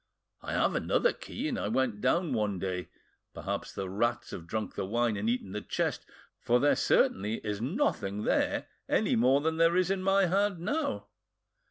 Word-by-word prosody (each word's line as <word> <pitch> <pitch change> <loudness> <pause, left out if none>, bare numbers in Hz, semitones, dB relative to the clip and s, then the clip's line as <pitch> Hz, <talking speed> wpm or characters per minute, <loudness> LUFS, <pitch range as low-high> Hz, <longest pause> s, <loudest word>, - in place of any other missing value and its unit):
I - - -5
have - - +2
another - - +2
key, 290 - -5
and 255 -5 -2
I - - -2
went 120 -6 0
down 155 +4 +1
one 105 -4 0
day; 90 -1 -3 0.5
perhaps - - -4
the 95 - -4
rats 120 +5 -1
have 85 - -7
drunk 110 +4 -3
the - - -3
wine 115 +3 0
and 105 +3 -1
eaten 120 -5 -2
the 105 +2 -4
chest, - - -2 0.3
for 120 +1 +2
there 145 +3 +4
certainly 105 +4 +2
is 105 0 -2
nothing 120 - -1
there - - +1 0.2
any - - +2
more 130 +4 +4
than 160 +1 0
there 165 +1 +4
is 185 +1 +2
in 195 -1 0
my 195 +1 +3
hand 195 +2 +1
now. 280 - -2
125 Hz, 185 wpm, -30 LUFS, -, 0.5 s, there